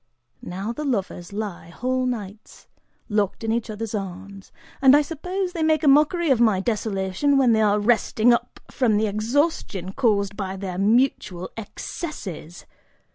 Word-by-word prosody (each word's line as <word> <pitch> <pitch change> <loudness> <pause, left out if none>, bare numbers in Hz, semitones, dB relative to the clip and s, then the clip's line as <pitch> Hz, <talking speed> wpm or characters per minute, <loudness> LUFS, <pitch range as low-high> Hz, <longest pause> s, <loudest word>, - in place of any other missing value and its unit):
Now 195 +6 -5
the 300 - -5
lovers 200 - -3
lie 200 -5 -5
whole 255 +7 -1
nights, 210 -4 -6 0.4
locked 210 -1 -1
in 225 - 0
each 230 0 -1
other's 215 0 -5
arms, 195 0 -6 0.3
and 270 0 +7
I 300 - +3
suppose 360 +5 -4
they 335 - -3
make 315 -1 +2
a - - +3
mockery 300 +3 +4
of 245 -3 +3
my 215 -5 +4
desolation 210 +5 0
when 260 -3 +4
they 220 - +3
are 210 -1 +3
resting 230 +1 +3
up 235 +1 -2
from 230 -6 +2
the 215 - +2
exhaustion 215 - -1
caused 205 -5 +1
by 195 -2 -4
their 185 -2 -5
mutual 200 -4 +1
excesses. 205 - -7
220 Hz, 155 wpm, -23 LUFS, 195-265 Hz, 0.4 s, and